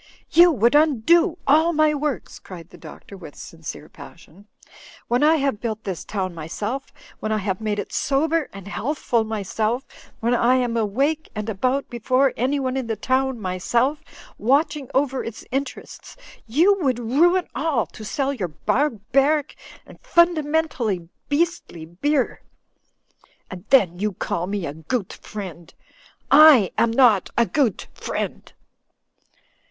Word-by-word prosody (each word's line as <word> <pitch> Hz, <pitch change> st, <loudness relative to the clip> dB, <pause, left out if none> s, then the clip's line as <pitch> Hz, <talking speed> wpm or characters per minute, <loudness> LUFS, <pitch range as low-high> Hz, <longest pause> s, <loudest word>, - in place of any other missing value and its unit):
"You 345 Hz, +2 st, +7 dB
would 235 Hz, 0 st, +2 dB
undo 315 Hz, -, +3 dB
all 315 Hz, +4 st, +4 dB
my 310 Hz, -1 st, +3 dB
works," 295 Hz, -3 st, -3 dB
cried 170 Hz, -3 st, -12 dB
the -, -, -13 dB
Doctor, 200 Hz, -, -12 dB
with 165 Hz, -6 st, -11 dB
sincere 160 Hz, -2 st, -9 dB
passion. 185 Hz, +4 st, -15 dB, 0.6 s
"When 245 Hz, +1 st, +1 dB
I 310 Hz, +2 st, +5 dB
have 275 Hz, -8 st, -1 dB
built 220 Hz, -2 st, -4 dB
this 190 Hz, -4 st, -5 dB
town 190 Hz, -3 st, -3 dB
myself, 205 Hz, -, -5 dB, 0.3 s
when 215 Hz, -, -3 dB
I 215 Hz, -, +1 dB
have 195 Hz, -1 st, -3 dB
made 210 Hz, -1 st, -2 dB
it 205 Hz, -, -5 dB
sober 310 Hz, +3 st, 0 dB
and 195 Hz, -1 st, -11 dB
healthful 235 Hz, -, -1 dB
my 220 Hz, -2 st, -4 dB
self, 225 Hz, +6 st, -2 dB, 0.3 s
when 235 Hz, +2 st, 0 dB
I 245 Hz, +1 st, +3 dB
am 245 Hz, -2 st, 0 dB
awake 270 Hz, +9 st, 0 dB
and 215 Hz, 0 st, -4 dB
about 255 Hz, +7 st, -1 dB
before 255 Hz, +3 st, +1 dB
anyone 260 Hz, +1 st, -1 dB
in 260 Hz, -3 st, -3 dB
the 225 Hz, -, -1 dB
town 260 Hz, +3 st, 0 dB
myself, 235 Hz, -, -1 dB, 0.4 s
watching 285 Hz, +3 st, +1 dB
over 270 Hz, -1 st, +1 dB
its 230 Hz, -1 st, -8 dB
interests 275 Hz, -, -6 dB, 0.2 s
— -, -, -23 dB
^you 360 Hz, -, +3 dB
would 260 Hz, -6 st, +1 dB
ruin 325 Hz, +10 st, +2 dB
all 285 Hz, -6 st, 0 dB
to 220 Hz, -, -12 dB
sell 275 Hz, +5 st, -1 dB
your 205 Hz, -9 st, -3 dB
barbaric 275 Hz, -, 0 dB, 0.3 s
and -, -, -15 dB
fundamentally 310 Hz, -, +1 dB, 0.2 s
beastly 290 Hz, -, -1 dB
beer. 260 Hz, -, -1 dB, 1.1 s
And 180 Hz, -2 st, -9 dB
then 185 Hz, -10 st, +4 dB
you 210 Hz, 0 st, -1 dB
call 175 Hz, 0 st, -3 dB
me 200 Hz, -2 st, -3 dB
a 140 Hz, -, -5 dB
goot 180 Hz, +7 st, -4 dB
friend. 180 Hz, -5 st, -9 dB, 0.6 s
I 285 Hz, -, +8 dB
am 235 Hz, -, +2 dB
not 230 Hz, -5 st, +4 dB
a 235 Hz, -, +4 dB
goot 255 Hz, -4 st, 0 dB
friend -, -, -5 dB
245 Hz, 145 wpm, -22 LUFS, 205-290 Hz, 1.1 s, I